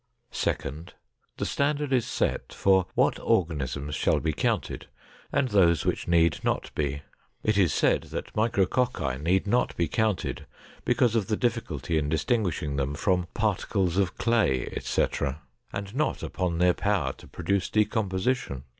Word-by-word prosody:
Second. 75 +5 -3 0.4
The - - -2
standard 145 0 0
is 120 -3 +2
set 125 - -1
for 95 -1 +3
what - - +2
organisms 75 -4 0
shall - - +2
be 80 -1 -1
counted - - -1 0.4
and 140 -2 +1
those 85 -6 +4
which - - -1
need 85 -2 +3
not - - -1
be. 70 -1 -2 0.4
It 110 - +2
is 95 -6 +4
said - - +2
that - - -6
micrococci 105 - +1
need 90 +5 +2
not 120 +5 +1
be 85 - +1
counted 110 +4 -1 0.4
because 120 -2 +2
of 105 -4 +1
the 110 - 0
difficulty 85 - -1
in 75 -1 -2
distinguishing 80 - 0
them 70 +1 -1
from 90 +2 +1
"particles 95 -4 0
of 100 0 +1
clay, 110 - +1
etc.," 70 +1 -1 0.3
and 100 0 -5
not 150 +4 -1
upon 90 -4 -2
their 90 +1 +4
power 100 -3 0
to - - -16
produce 100 -2 -1
decomposition. 105 - 0
95 Hz, 145 wpm, -27 LUFS, 75-110 Hz, 0.4 s, those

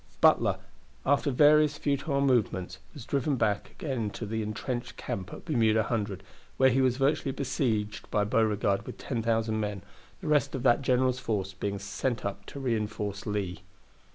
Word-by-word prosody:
Butler, - - +4 0.5
after 145 +1 +3
various 150 +2 +5
futile 140 0 0
movements, 95 -9 +1 0.2
was 135 -6 -9
driven 140 +1 0
back 105 -4 0
again 125 -8 -3
to 110 - -6
his 110 +1 -2
intrenched 120 +3 -4
camp 95 -2 -5
at - - -9
Bermuda 110 -8 +3
Hundred, 100 -5 -2 0.3
where 130 0 +5
he 135 +2 +3
was 130 -1 +2
virtually 140 0 +1
besieged 120 -6 -2
by 105 - +2
Beauregard 105 -2 +1
with - - -7
10,000 115 -3 -1
men, 105 -2 -3 0.4
the - - -7
rest 145 -3 +2
of 130 - -4
that 125 +1 +4
general's 130 -1 +2
force 100 -6 -2
being 100 +1 -3
sent 100 +5 -3
up 100 0 -5
to 140 - -7
reinforce 105 -5 -2
Lee. 100 -4 -2
115 Hz, 160 wpm, -29 LUFS, 105-135 Hz, 0.5 s, various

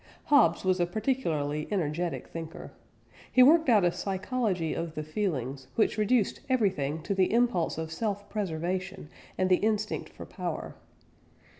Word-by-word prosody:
Hobbes 225 - +4
was 185 0 +2
a 175 - +2
particularly 165 - -1
energetic 170 -3 -2
thinker. 165 -1 -8 0.6
He 255 - +7
worked 315 +2 +6
out 210 -6 +5
a 175 - +3
psychology 190 -3 -2
of 165 -1 -4
the 155 - -3
feelings, 140 - -3
which 220 - +2
reduced 215 0 +2
everything 165 - 0
to - - -1
the 190 -1 +2
impulse 230 -9 +1
of 160 0 -4
self 205 +2 -3
preservation 185 -2 -3 0.3
and 185 - +2
the 185 -1 +4
instinct 215 0 -1
for - - -10
power. - - -5
185 Hz, 145 wpm, -29 LUFS, 160-215 Hz, 0.6 s, He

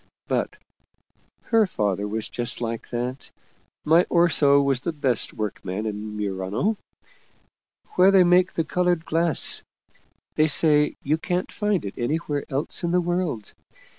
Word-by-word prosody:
But - - -2 0.9
her 225 -3 +2
father 105 - -2
was 110 +1 -3
just 120 -1 -2
like 115 -1 -5
that. 125 +2 -5 0.6
My 165 +3 +4
Orso 150 -5 +4
was 140 -2 +1
the 170 - -3
best 135 -7 0
workman 105 -1 -5
in 105 0 -5
Murano 100 - -2 1.2
where 185 +1 +5
they 195 -2 +5
make 180 +1 +3
the 165 - -1
colored 175 0 -1
glass. 165 -2 +1 0.7
They 155 - +2
say 150 -1 +5
you 155 +3 0
can't 180 +3 -3
find 210 - -1
it 100 - -5
anywhere 145 +3 -2
else 140 +3 -1
in 170 - 0
the 180 +1 +2
world. 175 - -3
150 Hz, 135 wpm, -23 LUFS, 115-175 Hz, 1.2 s, where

